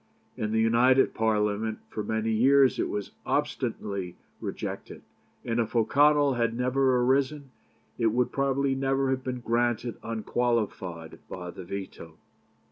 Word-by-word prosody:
In 105 0 -3
the 110 - +1
United 120 +4 +4
Parliament 110 0 0
for 110 - -5
many 110 +1 -1
years 135 +4 +4
it - - 0
was 105 -1 -4
obstinately 95 -3 -2 0.2
rejected, - - -6 0.4
and 115 0 -1
if 115 0 -2
O'Connell 145 +4 +4
had 115 -1 0
never 130 +1 +2
arisen 135 +2 +1 0.5
it 115 - +3
would 120 +3 +1
probably 140 0 +1
never 135 0 0
have 130 0 -1
been 125 -1 -4
granted 120 0 0
unqualified 110 -7 -2
by 90 -1 -6
the 90 - -9
veto. 90 -4 -7
120 Hz, 130 wpm, -27 LUFS, 110-130 Hz, 0.5 s, United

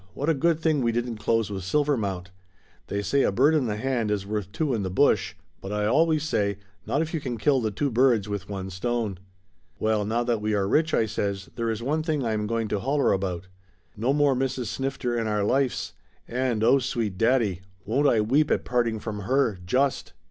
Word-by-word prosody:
"What 145 +4 -1
a - - +5
good 165 +2 +1
thing 155 -3 +1
we 120 -1 +2
didn't 120 0 -2
close 115 -2 0
with 95 -1 -4
Silvermount. 100 -7 -1 0.6
They 100 0 -2
say 140 +6 +2
a - - +2
bird 135 +10 +4
in 145 -6 +2
the 105 - -1
hand 120 -2 -1
is 105 -2 -1
worth 105 -2 -3
two 150 +2 -1
in 110 - 0
the 95 - -2
bush, 90 - +2 0.3
but 95 - -6
I 105 0 0
always 155 +6 +3
say, 100 -10 0 0.3
not 145 - +1
if 160 - -7
you 160 - 0
can 125 -4 -4
kill 135 +3 +2
the 110 - 0
two 135 +7 -2
birds 120 -4 +3
with 100 -1 -5
one 95 -1 -5
stone!'" 105 0 -2 0.6
"Well, 110 -1 +1
now 115 +3 0
that 120 -3 0
we 105 0 0
are 100 -1 +1
rich," 155 +8 +2
I 115 - +3
says, 100 -2 -3
"there 115 -1 -1
is 110 0 -3
one 150 +5 0
thing 155 -5 -1
I 110 - 0
am 105 -1 -1
going 115 0 -1
to 105 - -1
holler 140 +6 +1
about. 95 -2 -2 0.5
No 120 +5 0
more 145 -1 +3
Mrs. 130 -1 -1
Snifter 135 +1 -2
in 115 -1 -1
our 105 -1 0
lifes, 130 +4 0 0.3
and, 120 -3 -1
oh 130 +4 +5
sweet 115 -6 -2
daddy; 115 -6 +2 0.2
won't 135 +7 +2
I 115 -5 +4
weep 140 +8 +2
at - - 0
parting 120 -2 0
from 105 -1 -5
her, 115 -2 +1
just!" 135 +8 0
115 Hz, 220 wpm, -26 LUFS, 105-135 Hz, 0.6 s, a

